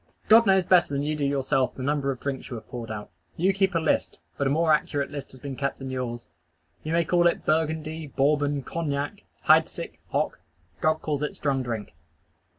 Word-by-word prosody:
_" - - -27
God 225 +1 +8
knows 190 -2 +4
better 180 -1 +5
than 140 0 -1
you 155 +1 -1
do 150 - -3
yourself 135 -1 +1
the 130 - -6
number 140 0 0
of 130 -2 -2
drinks 140 -2 -4
you 125 - -5
have 110 - -9
poured 120 -3 -6
out. 105 -1 -6 0.3
You 190 +4 +3
keep 190 -1 +1
a - - +4
list; 160 - 0 0.2
but 140 - 0
a - - +2
more 160 +2 +3
accurate 145 -2 0
list 145 -2 -6
has 130 - -12
been 140 0 -6
kept 140 +1 -2
than 135 -1 -6
yours. 120 -2 -4 0.6
You 155 - -4
may 170 0 +2
call 175 +1 +4
it 170 - 0
Burgundy, 160 0 0
Bourbon, 145 0 +1
Cognac, 145 -3 -3 0.2
Heidsick, - - +3
Hock; - - -1 0.4
God 155 +5 +1
calls 150 -2 -1
it 150 - -2
strong 135 -2 0
drink. 115 -6 -4
145 Hz, 210 wpm, -26 LUFS, 135-160 Hz, 0.6 s, God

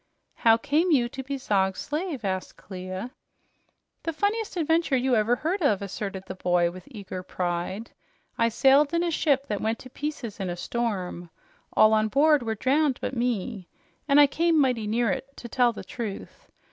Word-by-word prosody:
'" - - -46
"How 225 0 +8
came 295 +7 +1
you 260 -7 +3
to 265 - -6
be 275 +1 -4
Zog's 190 -6 0
slave?" 300 - -3
asked 190 -1 -3
Clia. 185 +4 -7 0.9
"The 330 - -2
funniest 410 +4 -1
adventure 325 -3 +2
you 255 0 +2
ever 220 +2 +3
heard 345 +9 -2
of," 215 - +3
asserted 195 -1 -5
the 185 - -6
boy 175 -2 +1
with 185 +1 -12
eager 200 -6 -7
pride. 180 +4 -3 0.4
"I 230 - +2
sailed 275 +6 +4
in 335 - +2
a 345 - 0
ship 280 -4 +1
that 210 -6 -3
went 220 +1 0
to 255 - -13
pieces 275 -9 -5
in 190 -2 -2
a 175 - -4
storm. 185 -6 -3 0.4
All 215 0 +6
on 215 0 +3
board 295 +4 +4
were 225 -2 -2
drowned 275 +4 +2
but - - -3
me, 235 -5 -2 0.4
and 280 0 +5
I 290 - +9
came 325 +3 +2
mighty 250 -6 +1
near 230 0 +1
it, 275 +8 -5
to 240 - -8
tell 245 +1 +3
the 230 - -8
truth. 220 -5 -7
240 Hz, 185 wpm, -26 LUFS, 200-285 Hz, 0.9 s, I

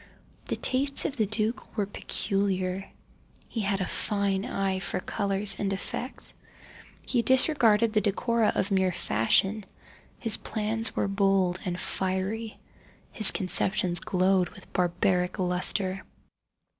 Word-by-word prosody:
The - - -3
tastes 275 +2 +2
of 280 - -2
the 215 -3 +1
duke 220 +3 -2
were 205 - +1
peculiar. 195 -1 -3 0.6
He 225 - -4
had 195 -1 -1
a - - 0
fine 200 0 -1
eye 195 -5 -2
for 185 0 -2
colours 200 0 +1
and 195 -1 -1
effects. 235 +6 -6 0.7
He 245 - 0
disregarded 235 -4 +4
the 215 - +2
decora 220 +3 0
of 200 - -1
mere 190 -1 +2
fashion. 185 - +1 0.5
His 225 -3 0
plans 220 +1 0
were - - 0
bold 195 -2 +1
and 180 -1 -3
fiery, 195 +4 -2
and - - -27 0.5
his 215 - +7
conceptions 185 -1 +2
glowed 185 -1 +1
with - - -15
barbaric 180 +1 0
lustre. 185 +1 0
195 Hz, 130 wpm, -27 LUFS, 185-220 Hz, 0.7 s, his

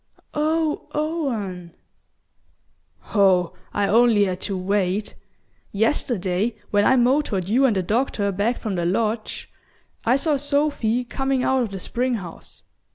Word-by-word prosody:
"Oh, 310 +1 0
Owen!" 230 - -3 1.4
"Oh, 185 -4 +3 0.2
I 205 -1 0
only 225 -1 +4
had 185 -2 -2
to 195 - -2
wait. 195 +1 -1 0.6
Yesterday, 210 -2 0 0.2
when 205 0 +3
I 260 - +5
motored 245 - +2
you 255 +6 +4
and 225 - +1
the 190 - 0
doctor 210 -1 0
back 205 +6 0
from 215 -4 -4
the 175 -2 -1
lodge, 215 +4 -2 0.5
I 235 +3 +3
saw 290 +1 +1
Sophy 280 -5 0
coming 270 +1 -1
out 265 -1 +2
of 235 - -1
the 195 -1 -6
spring 245 +6 -1
house. 180 -6 -9
220 Hz, 135 wpm, -23 LUFS, 195-265 Hz, 1.4 s, I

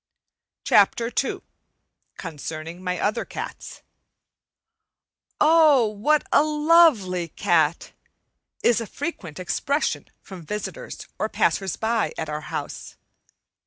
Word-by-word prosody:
CHAPTER 230 +3 +3
II - - -4 0.8
CONCERNING 165 +1 -7
MY 180 -1 -2
OTHER 210 - 0
CATS - - -8 1.6
"Oh, 305 -5 +6
what 265 +9 +1
a - - +6
lovely 300 - +3
cat!" 165 0 +1 0.7
is 235 -1 +3
a 230 - -5
frequent 200 - -6
expression 275 - -1 0.2
from 190 -3 -10
visitors 210 - -6
or - - -1
passers 190 -4 0
by 225 0 0
at 160 - -4
our 150 0 -4
house. - - -6
210 Hz, 100 wpm, -24 LUFS, -, 1.6 s, Oh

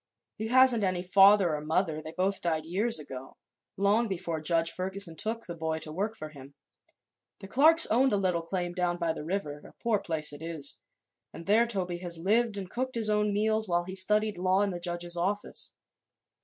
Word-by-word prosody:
He 220 - -4
hasn't 250 -2 +5
any 185 -2 0
father 195 -1 +5
or 150 - -3
mother; 160 0 -1
they 155 0 -8
both 185 +4 -1
died 160 -2 -1
years 205 +8 +2
ago, 135 -3 -9 0.4
long 205 +4 +2
before 170 -5 -4
Judge 165 +1 +1
Ferguson 185 -2 -4
took 225 +5 -3
the 170 - -6
boy 160 -1 -2
to 155 -1 -8
work 205 +7 -3
for 155 - -7
him. 140 -2 -14 0.8
The 195 - -9
Clarks 310 - +6
owned 260 +4 +2
a 205 - +2
little 180 -3 0
cabin 175 +1 -3
down 175 -1 -1
by 170 -2 -1
the 155 - -7
river 160 -4 -3
a - - -14
poor 230 -3 0
place 155 -5 -1
it 145 - -10
is 160 -4 -4 0.5
and 165 - -10
there 225 +4 +3
Toby 180 -6 -3
has 175 -2 -3
lived 215 +5 +1
and 195 -2 -5
cooked 255 +6 -4
his 220 -2 +1
own 210 0 +1
meals 215 +1 0
while 175 -1 +1
he 185 +2 -8
studied 210 +1 +1
law 185 +2 +2
in 200 - -1
the 175 - -5
judge's 175 0 -3
office. 200 +4 -2
185 Hz, 200 wpm, -29 LUFS, 165-210 Hz, 0.8 s, Clarks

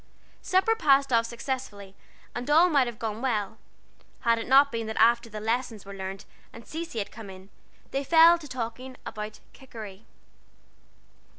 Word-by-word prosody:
Supper 380 +5 +2
passed 275 - +3
off 230 0 +3
successfully, 235 -5 -5 0.4
and 245 +3 -5
all 330 +4 +6
might 275 -4 +3
have 235 -2 -6
gone 220 0 -4
well, 220 -5 -2 0.6
had 230 -1 +2
it 225 - -6
not 275 +2 +6
been 230 -1 -3
that 220 - -5
after 235 +1 +4
the 215 -1 -7
lessons 225 -1 -2
were 200 - -9
learned 195 +1 -7 0.3
and 230 - -13
Cecy 325 -5 -6
had 205 - -3
come 220 -3 -10
in, 190 +1 -12 0.4
they 275 +1 -1
fell 330 +3 +6
to 305 - -10
talking 255 0 -6
about 215 0 -6
"Kikeri." 220 -6 -11
235 Hz, 165 wpm, -27 LUFS, 215-270 Hz, 0.6 s, all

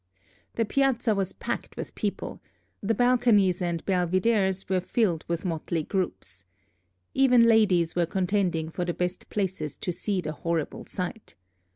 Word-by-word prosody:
The 230 - +1
Piazza 250 -2 +2
was 195 -2 -1
packed - - -5
with - - -6
people; - - -4 0.4
the 220 +3 0
balconies 230 -6 +3
and 170 -2 -2
belvideres 190 +1 +1
were 185 -1 +1
filled 185 -4 0
with 170 +2 -2
motley 165 -1 -2
groups. 180 - -3 0.7
Even 250 -3 +5
ladies 200 -8 +4
were 175 -1 +2
contending 180 -3 0
for 180 - -2
the 175 -1 -2
best 180 0 -3
places 190 -7 -2
to 180 - -3
see 195 +2 -2
the 155 -3 -3
horrible 165 0 -3
sight. 185 +4 -5
185 Hz, 145 wpm, -27 LUFS, 170-215 Hz, 0.7 s, Even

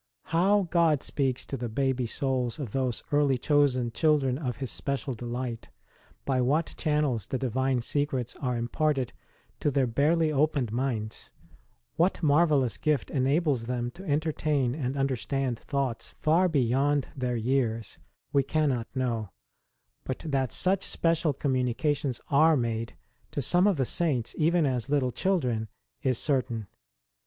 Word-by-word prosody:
Plow 195 +5 +3
God 165 -5 +3
speaks 130 -3 -1
to - - -4
the 120 -2 -4
baby 130 +1 0
souls 130 0 -1
of 135 -9 -5
those 130 -2 -1
early 145 -2 +3
chosen 130 -3 +2
children 145 -2 +2
of 125 -7 -3
His 130 -3 -3
special 140 -1 -3
delight; 120 0 -5 0.6
by 130 -2 +1
what 150 +6 +1
channels 150 - 0
the 130 - -2
Divine 130 0 0
secrets 130 -2 -1
are 125 -3 -1
imparted 130 +2 0 0.5
to - - +1
their 140 -2 +2
barely 155 +7 +2
opened 145 -5 +1
minds; 115 -3 -3 0.7
what 175 +1 +1
marvellous 145 - +3
gift 150 -4 0
enables 135 -2 +1
them 120 0 -2
to 185 - -12
entertain 145 -3 +1
and 135 -2 -3
understand 135 -1 -1
thoughts 135 -5 -2
far 170 +4 +2
beyond 140 0 +1
their 125 -2 -1
years 115 -2 -1 0.3
we 140 - +5
cannot 135 -4 0
know; 115 -5 -1 0.7
but 130 - -5
that 135 -5 0
such 190 +1 +2
special 165 -3 +1
communica 130 +1 0
tions 135 -4 -4
are 155 +2 +5
made 115 -2 -2 0.3
to - - -4
some 175 - +3
of 200 -5 +2
the 135 - +1
Saints 135 -6 0
even 165 +1 +2
as 125 -3 -1
little 140 -3 +1
children 125 - 0 0.3
is 130 -3 +1
certain. 125 -6 0
135 Hz, 145 wpm, -28 LUFS, 125-150 Hz, 0.7 s, we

